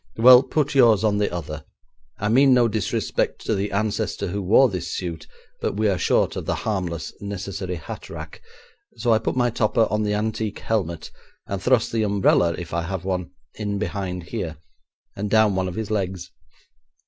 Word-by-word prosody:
Well, 125 +2 +9
put 150 +1 -1
yours 115 -6 +5
on 105 -2 +2
the 105 - 0
other. 75 -3 -5 0.5
I 105 - -2
mean 130 +4 +5
no 120 -1 +4
disrespect 110 0 -1
to - - +1
the 100 0 -1
ancestor 100 -1 -1
who 100 +3 -3
wore 110 +8 +5
this 90 -7 -4
suit, 85 -4 -5 0.3
but - - -1
we 110 0 +2
are 95 -3 +1
short - - +2
of - - -5
the - - 0
harmless, 90 -6 -2
necessary 95 -2 -4
hat 80 - -8
rack, - - -9 0.6
so 120 - +2
I 110 - +3
put 110 - -2
my 120 -1 +2
topper 110 0 +2
on 105 +1 +1
the 105 -1 0
antique 110 0 -2
helmet, 85 -7 -2 0.3
and 100 -1 -4
thrust 125 -1 +2
the 115 - 0
umbrella 100 -5 +3
(if 85 -2 -7
I 85 - 0
have 90 +2 -4
one) 90 -2 -2 0.2
in 105 -2 -3
behind 95 -3 -3
here, 85 -4 -5 0.6
and 105 +1 -3
down 110 -1 +4
one 95 0 0
of 90 - -5
his 110 -1 -4
legs. 95 -3 -2
100 Hz, 185 wpm, -23 LUFS, 90-110 Hz, 0.6 s, Well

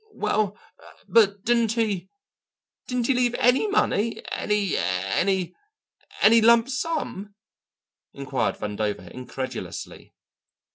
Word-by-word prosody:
"Well, 210 -1 0 0.5
but 205 -3 +3
didn't 235 -1 +2
he 205 -6 -1 0.8
didn't 250 -2 -1
he 270 - +3
leave 245 -1 +1
any 250 - +3
money, 230 - 0
any 210 -3 0
any 100 - 0 0.7
any 230 +1 +7
lump 235 +2 +5
sum?" 265 - -3 0.8
inquired 135 -7 -2
Vandover 105 -4 -4
incredulously. 130 +1 -7
205 Hz, 95 wpm, -24 LUFS, -, 0.8 s, any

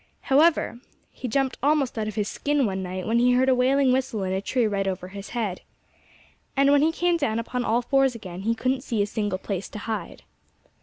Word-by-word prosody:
However, 300 -4 +3 0.3
he 255 - -6
jumped 265 +2 0
almost 285 -2 +2
out 220 -2 -2
of 215 - -5
his 210 -2 -1
skin 290 +2 0
one 190 -2 -2
night, 185 0 -5
when 230 +3 +2
he 250 +1 +4
heard 260 +1 +3
a - - +5
wailing 260 +1 +3
whistle 255 -5 0
in 185 0 -1
a 190 - -1
tree 240 +4 0
right 200 -2 -1
over 185 -1 -3
his 200 +1 -8
head. 205 -6 -2 1.0
And 275 +1 +5
when 285 0 +5
he 315 +2 +3
came 345 +1 +1
down 225 -8 -1
upon 245 +2 -2
all 235 +1 +1
fours 270 -1 +2
again 185 -5 -8
he 225 +3 0
couldn't 255 +2 0
see 230 -6 -1
a - - 0
single 205 -2 -2
place 195 0 -4
to - - -8
hide. 220 +1 -5
235 Hz, 220 wpm, -25 LUFS, 200-270 Hz, 1.0 s, a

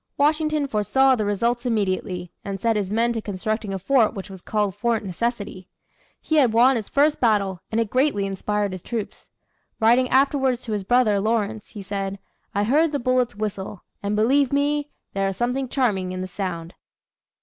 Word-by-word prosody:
Washington 305 0 +2
foresaw 265 +4 +3
the 215 -3 -1
results 235 +4 0
immediately, 190 -6 -1
and 195 -1 -4
set 225 +2 +1
his 200 -3 -1
men 230 +3 +1
to 225 - -3
constructing 215 +1 -3
a 195 - -2
fort 225 +3 +2
which 195 0 -7
was 190 -2 -10
called 210 -1 -1
Fort 235 +2 0
Necessity. 200 -1 -3 0.5
He 315 - 0
had 255 -7 +4
won 250 +4 +5
his 220 -4 -4
first 295 +2 +2
battle 200 -6 +1
and 225 - +1
it 225 -3 -1
greatly 255 -6 +2
inspired 200 +1 -1
his 185 -1 -6
troops. 225 0 -6 0.5
Writing 245 +3 +4
afterwards 265 -2 +2
to 225 - -6
his 205 -2 -1
brother, 220 -1 +3
Lawrence, 215 0 -1
he 205 - -9
said: 195 0 -3 0.4
"I 205 - +2
heard 295 +8 +3
the 290 - 0
bullets 250 -2 +1
whistle; 205 -2 -5 0.2
and, 205 +1 -1
believe 260 +5 +3
me, 290 +1 +1 0.2
there 195 0 0
is 195 -1 -3
something 250 +2 -1
charming 195 -9 0
in 185 - -4
the 185 - -4
sound." 175 -3 -5
220 Hz, 180 wpm, -23 LUFS, 195-255 Hz, 0.5 s, won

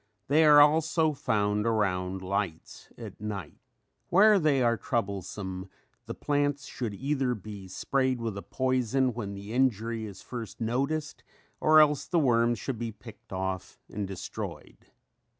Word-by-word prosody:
They 155 +3 +5
are 150 -1 +8
also 160 +1 +4
found 105 -4 0
around 95 -4 0
lights 95 -3 -4
at - - -10
night. 100 -6 -6 0.5
Where 205 +3 +6
they 145 -6 +2
are 120 -1 +3
troublesome 95 -5 -4 0.4
the - - -5
plants 145 -1 0
should 115 -5 -5
either 135 0 0
be 100 -2 -9
sprayed 130 +6 0
with 115 -3 -3
a 100 - -5
poison 130 0 0
when 105 -4 -5
the 100 +3 -8
injury 115 -3 0
is 95 -2 -11
first 115 -5 -7
noticed 140 +7 -2 0.4
or 155 0 +6
else 150 -2 +4
the 175 - 0
worms 120 -5 +3
should 125 -2 -4
be 115 -1 -3
picked 110 +1 -14
off 95 -1 -4 0.2
and 100 -1 -3
destroyed. 95 -1 -7
115 Hz, 145 wpm, -28 LUFS, 100-140 Hz, 0.5 s, are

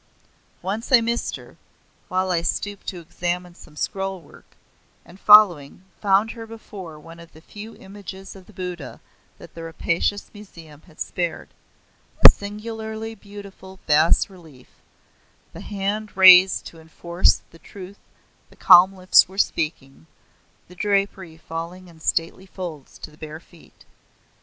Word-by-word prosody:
Once 210 +7 -4
I 255 - +8
missed 235 +1 -2
her, - - -14 0.5
while 185 0 -1
I 170 -2 +1
stooped 205 +3 -4
to 180 - -5
examine 175 +1 -4
some 155 -3 -17
scroll 195 +4 -3
work, 155 - -20 0.5
and 175 +3 -16
following, 185 -8 +5 0.2
found 205 +2 +2
her 225 -1 -10
before 195 -8 -10
one 165 +2 -14
of 170 0 -15
the 160 - -15
few 210 +6 -11
images 195 -1 -11
of 190 -2 -15
the - - -16
Buddha 180 -6 -7 0.4
that - - -15
the 165 - -10
rapacious 170 +4 -2
Museum 165 -8 -14
had 160 - -21
spared 175 -2 -4 0.8
a - - +14
singularly 220 +2 -7
beautiful 200 -2 -13
bas 155 +2 +3
relief, 160 -9 -17 0.8
the - - -10
hand 205 +1 -4
raised 185 0 +7
to 165 - -11
enforce 170 +2 0
the 165 - -17
truth 195 +2 -12 0.5
the - - -20
calm 185 +1 +7
lips 185 0 +5
were 190 +2 -15
speaking, 135 - -2 0.6
the 180 - -15
drapery 195 -3 -2
falling 165 +3 -8
in 165 -2 -17
stately 165 +4 -2
folds 175 -7 -9
to - - -10
the 150 - -20
bare 155 0 -9
feet. 170 -1 -21
185 Hz, 140 wpm, -22 LUFS, 165-200 Hz, 0.8 s, a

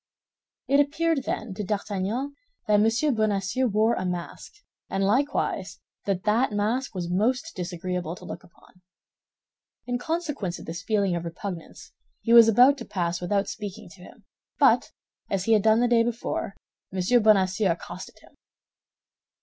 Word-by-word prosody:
It 280 +2 +4
appeared, 310 0 +1
then, 220 -3 -3
to 210 +2 -4
D'Artagnan 210 +6 -2 0.3
that 210 -1 +4
M. 230 +6 +2
Bonacieux 215 +3 0
wore 220 +2 +2
a 185 - -2
mask, 180 - -5 0.3
and 195 - -1
likewise 195 - 0 0.3
that 195 -2 -1
that 225 +4 +2
mask 215 +4 -1
was 175 -2 -3
most 230 +8 0
disagreeable 180 -1 -4
to - - -13
look - - -7
upon. 180 +1 -22 1.0
In 245 0 -2
consequence 295 - -3
of - - -11
this 165 +3 -6
feeling 200 -4 +1
of 170 - -3
repugnance, 170 0 -7 0.3
he 230 - +1
was 230 -1 +9
about 250 +5 +5
to 235 - -7
pass 175 -4 -2
without 200 +3 0
speaking 205 -4 -7
to 180 - -16
him, - - -15 0.3
but, - - +4 0.4
as 195 -2 -1
he 225 - +3
had 215 - +4
done 220 +2 +4
the 245 - +3
day 235 -1 +4
before, 230 -4 -3 0.4
M. 190 +6 +2
Bonacieux 195 -2 +3
accosted 170 - -7
him. - - -19
210 Hz, 155 wpm, -26 LUFS, 185-240 Hz, 1.0 s, was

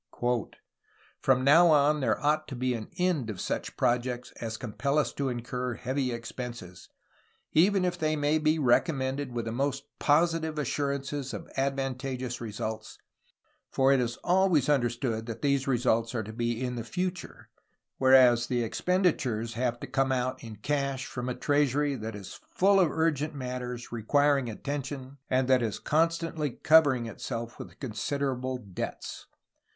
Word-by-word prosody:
"From 130 -1 +2
now 160 +6 +7
on 150 -1 +4
there 135 - +1
ought... 155 +1 +2
to 135 - -6
be 125 +1 0
[an 110 -2 -5
end] 175 -10 +1
of 100 -4 -5
such - - -3
projects 125 0 0
as 110 -1 -4
compel 125 +5 -2
us 150 - +1
to 140 -1 -1
incur 125 0 -3
heavy 130 +2 -2
expenses, 120 -5 -7 0.6
even 185 +3 +4
if 175 -1 -2
they 155 0 +1
may 150 +1 +1
be 155 +1 +2
recom 145 +3 +3
mended 130 0 -2
with 120 -1 -3
the 115 - -3
most 135 +3 -1 0.2
positive 160 +1 +2
assurances 140 -1 -2
of - - -8
advantageous 135 -2 -2
results, 110 0 -5 0.7
for 135 0 +3
it 135 - +3
is 120 -1 -1
always 180 -6 +3
understood 120 -4 0
that 115 +2 -6
these 140 -1 +1
results 120 -2 +1
are 110 - -1
to 110 +2 -8
be 120 0 -1
in 125 -1 -3
the 115 - -3
future, 180 +4 -5 0.5
whereas 125 -3 +6
the 120 -1 0
expenditures 125 - 0
have 120 +1 -1
to - - -4
come 135 0 0
out 130 0 -1
in 110 -2 -8
cash 140 +3 -2
from 125 0 -5
a 125 - -2
treasury 145 0 +1
that 110 -4 -5
is 100 -3 -9 0.2
full 195 +1 +5
of 175 -4 +4
urgent 155 -1 0
matters 125 -2 -5
requiring 140 +3 +2
attention 135 +2 -5
and 130 0 +2
that 130 -1 +4
is 110 -3 -1
con 160 +2 +2
stantly 165 -4 -4
covering 145 -6 +5
itself 115 +1 -6
with - - -10
considerable 130 +1 -2
debts. 100 -7 -6
130 Hz, 155 wpm, -28 LUFS, 120-145 Hz, 0.7 s, now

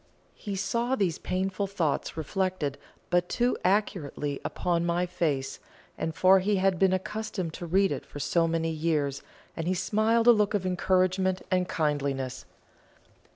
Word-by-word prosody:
He 200 -2 -6
saw 235 +6 0
these 190 -9 0
painful 190 +2 -2
thoughts 170 -6 -1
reflected 160 -3 -2 0.3
but 175 0 +2
too 245 +1 +1
accurately 175 -7 0
upon 170 -1 -1
my 175 +1 +1
face, 150 -6 -2 0.5
for 190 +3 +5
he 205 +2 +1
had 190 -2 +2
been 190 -1 +4
accustomed 210 -2 -3
to 175 - -6
read 195 +3 +3
it - - -3
for - - -11
so 165 +4 +2
many 165 0 0
years, 150 -4 -1 0.3
and 165 0 -3
he 185 - +1
smiled 220 +5 +2
a 240 - +9
look 210 -2 +2
of 190 -2 -1
encouragement 185 +1 +1
and 185 0 +1
kindliness. 140 -5 -1
185 Hz, 150 wpm, -28 LUFS, 160-195 Hz, 0.5 s, a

